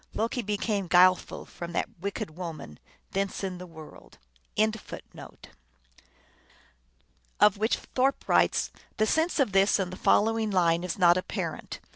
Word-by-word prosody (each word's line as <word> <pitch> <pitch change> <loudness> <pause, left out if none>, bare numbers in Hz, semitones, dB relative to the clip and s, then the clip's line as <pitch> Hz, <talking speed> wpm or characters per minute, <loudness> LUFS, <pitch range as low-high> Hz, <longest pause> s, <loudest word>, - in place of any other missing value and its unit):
Loki 230 +3 -1
became 205 -2 -2
guileful 180 +1 +4
from 170 0 -8
that - - -3
wicked 185 -4 -5
woman: 160 - -7 0.3
thence 195 +1 -2
in 185 -2 -4
the 180 - -8
world 160 -2 -14 0.4
are - - +7
all - - +6
giantesses 220 -1 -6
come." - - -11 2.0
Of 210 -1 +5
which 220 +2 +1
Thorpe 265 +2 -1
writes, - - +2
" - - -32
The 215 - +3
sense 320 +7 +1
of 265 -7 +2
this 195 +1 +4
and 185 -2 -3
the - - -7
following 225 0 +2
line 175 -3 +2
is 180 - -3
not 175 -2 +5
apparent. 185 - -5
195 Hz, 155 wpm, -28 LUFS, 175-215 Hz, 2.0 s, are